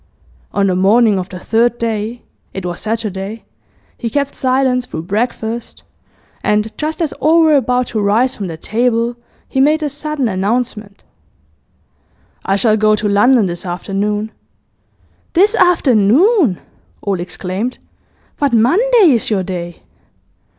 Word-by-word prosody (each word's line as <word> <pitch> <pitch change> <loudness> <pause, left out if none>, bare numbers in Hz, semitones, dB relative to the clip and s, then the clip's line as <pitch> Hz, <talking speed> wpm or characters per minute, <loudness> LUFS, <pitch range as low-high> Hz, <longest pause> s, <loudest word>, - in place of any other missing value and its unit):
On 200 - +1
the 185 -2 +1
morning 205 +2 +3
of 185 +1 -5
the 185 - -8
third 230 +5 +1
day 230 +1 -3 0.3
it 190 -2 -5
was 175 -1 -4
Saturday 215 -1 -4 0.6
he 235 - -3
kept 280 +3 -1
silence 255 -1 0
through 160 - -6
breakfast, 225 +3 -3 0.6
and 210 +1 0
just 315 +3 -2
as 305 - -2
all 325 +2 +4
were 310 -2 +4
about 250 -2 +1
to 220 - -2
rise 220 +6 +2
from 200 - -5
the 165 -2 -6
table, 235 +5 0 0.3
he 265 - -2
made 305 +3 +3
a 295 - -1
sudden 295 -2 -3
announcement: 210 +1 -2 1.4
'I 195 - +1
shall 215 +1 +2
go 215 0 +3
to 215 0 -2
London 215 +3 +4
this 175 -1 -4
afternoon.' 200 +4 -3 1.0
'This 400 +5 +4
afternoon?' 310 - +3 0.4
all 195 -3 -1
exclaimed. 185 +6 -4 0.6
'But 285 -4 +1
Monday 370 - +4
is 235 -4 +1
your 200 -4 0
day. 175 -2 -6
225 Hz, 135 wpm, -16 LUFS, 200-260 Hz, 1.4 s, all